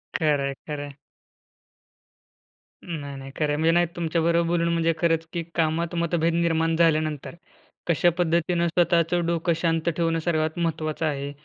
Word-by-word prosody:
खरंय, 145 -3 +1
खरंय. 145 -2 -5 1.9
नाही, 145 -5 -6
नाही 135 0 -9
खरं 150 - +1
आहे, 145 - +1
म्हणजे 160 +2 +3
नाही 175 +1 +3
तुमच्याबरोबर 170 0 +1
बोलून 170 0 +1
म्हणजे 165 0 +2
खरंच 165 -1 +1
की 170 - -1
कामात 165 +1 0
मतभेद 170 0 +1
निर्माण 165 -1 +1
झाल्यानंतर 155 -2 +1 0.5
कशा 170 +1 +3
पद्धतीनं 170 0 +1
स्वतःचं 170 0 +2
डोकं 170 0 +1
शांत 165 -1 +1
ठेवणं 165 -1 +1
सर्वात 160 -2 0
महत्त्वाचं 160 -1 -2
आहे. 140 -2 -2
165 Hz, 135 wpm, -25 LUFS, 155-170 Hz, 1.9 s, म्हणजे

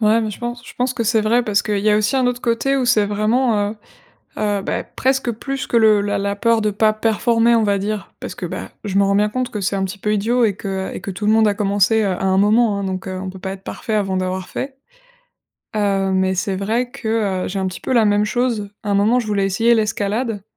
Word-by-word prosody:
Ouais, 220 +1 +4
mais 215 -1 -2
je - - -9
pense 240 0 -5
je - - -11
pense 250 +1 -1
que 235 -2 -2
c'est 225 0 +3
vrai, 235 +3 +2
parce 205 -2 +1
qu'il 205 -1 -1
y 210 +2 +2
a 210 - +4
aussi 215 +5 +1
un 260 -1 +2
autre 245 0 -1
côté 245 +4 0
où 260 - +1
c'est 215 -4 +3
vraiment 215 0 +1
heu, 220 - -9 0.6
heu, 205 -1 0
bah, - - -2
presque 265 -2 0
plus 270 +4 -4
que 235 - +2
le 215 -2 +5
la 205 0 -1
la 200 0 -2
peur 230 +1 +2
de 210 -1 +1
pas 215 +1 +2
performer, 230 +2 +2
on 230 - +3
va 200 -1 +1
dire, 210 +1 -4
parce - - -6
que, - - -7
bah, - - -5 0.2
je 200 -1 0
m'en 200 - +4
rends 200 - +2
bien 210 +1 +2
compte 255 +1 -2
que 210 -4 -4
c'est 190 +2 0
un 190 - 0
petit 190 +2 -5
peu 210 +2 -1
idiot 235 +4 +2
et 210 -3 +1
que 190 -1 -4
et - - -5
que - - -6
tout 195 +3 -6
le 215 - +4
monde 220 -1 +4
a 205 - +1
commencé, 205 +2 +2
heu, 200 - +1
à 185 +1 -3
un 190 0 +2
moment, 210 +1 +3
hein. 200 - -3
Donc, 190 0 -4
heu, 185 0 -4
on 185 0 -5
peut 190 - -11
pas 190 0 -5
être 195 0 -10
parfait 220 - -4
avant 195 -3 0
d'avoir 185 0 -3
fait. 270 0 -5 1.0
Heu, 195 -2 +1
mais 190 0 +1
c'est 190 +1 -1
vrai 230 +5 -1
que, 215 -6 -1
heu, - - -3
j'ai 195 +1 -3
un 190 - -1
petit 185 - -5
peu 260 - -2
la 230 -2 +5
même 205 0 +2
chose. 235 -3 -1
À 205 - -3
un - - +2
moment, 215 +5 +3
je 235 - -2
voulais 200 -2 +1
essayer 225 +5 +3
l'escalade. 215 0 -1
210 Hz, 275 wpm, -19 LUFS, 200-230 Hz, 1.0 s, le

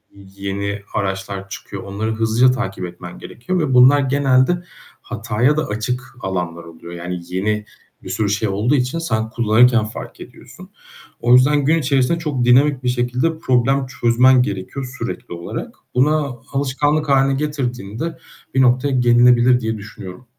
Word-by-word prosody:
yeni 100 +1 -5
araçlar 95 0 -3
çıkıyor. - - -8
Onları 105 +3 -3
hızlıca 115 +3 +3
takip 115 -7 -4
etmen 90 0 -10
gerekiyor 180 +10 -4
ve 150 -5 0
bunlar 130 +3 +7
genelde 135 +4 +2 0.4
hataya 125 +8 0
da 155 - 0
açık 125 +5 -4
alanlar 90 -3 -4
oluyor, 85 +1 -12
yani. 90 +1 -5
Yeni 105 +3 -1 0.4
bir - - -8
sürü 105 -2 -1
şey 105 +1 0
olduğu 105 +8 +1
için 130 +4 -1
sen 110 -9 -2
kullanırken 120 0 +3
fark 110 - -9
ediyorsun. - - -13 0.5
O 120 +1 +3
yüzden 140 +3 +4
gün 160 +3 +3
içerisinde 140 +2 +1
çok 145 -7 -2
dinamik 130 +2 +4
bir 125 - +1
şekilde 125 +6 -1
problem 130 0 +1
çözmen 125 +1 +3
gerekiyor 125 +6 -5
sürekli 115 -6 -5
olarak. 85 0 -6 0.2
Bunu 140 -2 +1
alışkanlık 145 +3 0
hâline 135 0 +3
getirdiğinde 135 -1 -4 0.4
bir 130 - +4
noktaya 130 +2 +3
gelinebilir 125 0 +4
diye 110 -2 -3
düşünüyorum. 105 +2 -10
125 Hz, 145 wpm, -19 LUFS, 105-135 Hz, 0.5 s, bunlar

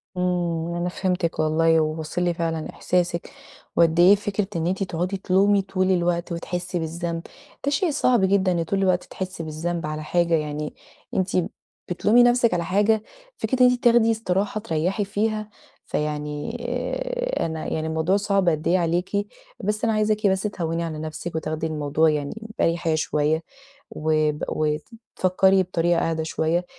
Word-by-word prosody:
آمم، 175 -2 -1
أنا 175 +1 -1
فهمتِك 180 -2 -1
والله، 160 +1 +3
وواصل 155 +2 -2
لي 175 -1 +1
فعلًا 165 -2 -2
إحساسِك، 175 -1 -1 0.5
وقد 165 0 +4
إيه 185 +4 +8
فكرة 205 0 -2
إن 165 0 0
أنتِ 190 +2 0
تقعدي 185 +1 -2
تلومي 195 +2 +3
طول 190 -1 0
الوقت، 175 -1 0
وتحسّي 175 +1 -3
بالذنب 165 +1 -3 0.4
ده 285 - +1
شيء 315 +4 +1
صعب 250 -7 +2
جدًا، 190 -1 +2
إن 170 -2 +1
طول 195 +4 -1
الوقت 185 -2 +2
تحسّي 185 -2 -6
بالذنب 165 +2 -3
على 155 0 -4
حاجة، 170 +2 +1
يعني 150 -1 -1 0.4
أنتِ 190 0 0 0.5
بتلومي 210 +7 +4
نفسِك 240 -3 +4
على 170 -1 0
حاجة، 210 +4 +2 0.3
فكرة 235 +4 -1
إن 250 - +8
أنتِ 250 0 -3
تاخدي 235 -2 +5
إستراحة 205 -1 -1
تريحي 180 +5 -1
فيها، 215 +1 -1 0.4
فيعني 150 +6 -3 0.9
أنا 160 -1 -4
يعني 160 0 -2
الموضوع 160 +4 +1
صعب 200 -2 +2
قد 155 -1 -1
إيه 180 - +4
عليكِ، 180 +4 0 0.4
بس 210 +2 -1
أنا 225 -1 +2
عايزاكِ 215 0 +2
بس 190 -1 +2
تهوّني 170 -5 -2
على 160 -2 -4
نفسِك، 155 +2 -6
وتاخدي 155 0 -2
الموضوع 155 0 +1
يعني 145 -2 -1 0.3
بأريحيّة 165 -1 +1
شوية، 155 +1 0 0.5
وب 155 0 0
وفكّري 185 +3 +1
بطريقة 175 -1 +1
أهدي 160 -1 -1
شوية، 160 +2 0
175 Hz, 150 wpm, -24 LUFS, 160-195 Hz, 0.9 s, إيه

